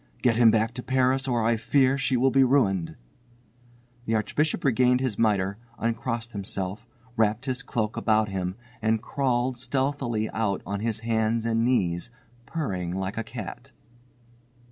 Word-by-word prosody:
Get 120 -2 +4
him 115 -1 +6
back 110 +1 +2
to 125 - -5
Paris 130 +1 +1
or 120 -3 +1
I 115 +1 +2
fear 130 +4 +3
she 135 -2 +1
will 130 +2 +3
be 135 +2 +5
ruined." 100 -10 +2 1.1
The 115 - 0
Archbishop 145 +9 0
regained 125 -1 +3
his 130 -5 -2
mitre, 100 -2 +1 0.2
uncrossed 115 0 -2
himself, 100 +2 -4 0.3
wrapped 110 +2 +1
his 130 -1 -1
cloak 110 -5 -2
about 110 -1 +2
him, 95 -1 -3 0.3
and 110 0 +2
crawled 125 -2 0
stealthily 125 -3 -1
out 105 -4 -1
on 100 0 -3
his 110 0 -2
hands 115 0 0
and 115 0 +1
knees, 95 -6 +1 0.4
purring 95 - -3
like 95 +1 -3
a - - -2
cat. 115 -2 -8
115 Hz, 150 wpm, -26 LUFS, 105-125 Hz, 1.1 s, him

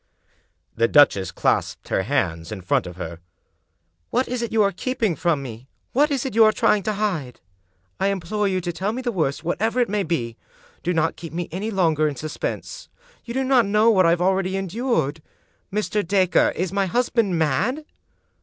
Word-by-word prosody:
The 115 0 +3
duchess 115 -9 +4
clasped - - -1
her - - +1
hands 80 0 -1
in 105 -3 -6
front 90 - 0
of 90 - -8
her. 85 -2 -7 0.9
"What 255 +2 0
is 250 -1 -3
it 235 - -3
you 220 -1 +3
are 200 - +2
keeping 225 -1 -1
from 160 -5 0
me? 120 0 -9 0.3
What 290 +4 +3
is 275 -3 -1
it 265 - -3
you 225 +1 +6
are 215 - +6
trying 210 -1 +2
to - - 0
hide? 180 - -2 0.6
I 195 - +2
implore 200 +2 -1
you 185 -1 0
to 175 0 -3
tell 195 +5 -2
me 255 +2 -4
the 240 - -1
worst, 155 -7 -1
whatever 220 +8 0
it 245 - +2
may 210 0 0
be 125 -10 -2
I - - -30
Do 180 - -1
not 160 0 +1
keep 165 -1 -9
me 175 0 -3
any 195 +6 -3
longer 165 -7 +2
in 145 - -3
sus 155 +3 -6
pense; - - -5 0.4
you 235 0 -6
do 265 - +1
not 260 -4 +3
know 210 +3 +4
what 185 -5 +4
I 165 - +5
already 190 +1 +1
have 195 - 0
endured. 185 - -1 0.5
Mr. 210 +1 0
Dacre, 185 0 +3
is 185 +1 -2
my 195 -1 +1
husband 230 -3 +1
mad?" 195 - 0
190 Hz, 200 wpm, -23 LUFS, 160-220 Hz, 0.9 s, you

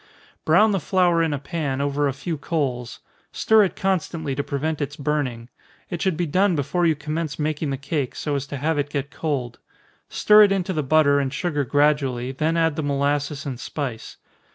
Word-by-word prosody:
Brown 215 0 +5
the 195 - +1
flour 175 0 +2
in 165 -1 +1
a 145 - -1
pan, 140 -1 -3
over 145 +1 0
a - - 0
few 150 +5 -4
coals 135 -6 -3 0.3
stir 220 -2 +4
it 185 - -4
constantly 170 -6 -1
to 140 +2 -2
prevent 150 +3 -2
its 145 0 -3
burning. 135 -5 -2 0.4
It 175 - -3
should 185 -5 0
be 175 - 0
done 185 +4 +2
before 155 +5 0
you 160 - +3
commence 155 +1 -4
making 150 0 -2
the 135 - -2
cake, 140 -1 -3
so 150 - -3
as 140 0 -3
to 140 - -5
have 150 +2 0
it 145 0 -1
get 140 -1 -3
cold. 135 -7 -3 0.5
Stir 210 0 +6
it 205 -2 +6
into 190 -1 0
the 155 - 0
butter 145 0 +4
and 135 -2 -1
sugar 150 -2 -1
gradually, 135 -2 +1
then 155 +5 0
add 165 -2 +1
the - - 0
molasses 145 +1 -1
and 130 -4 -5
spice. 130 -4 -5
145 Hz, 200 wpm, -23 LUFS, 140-165 Hz, 0.5 s, Stir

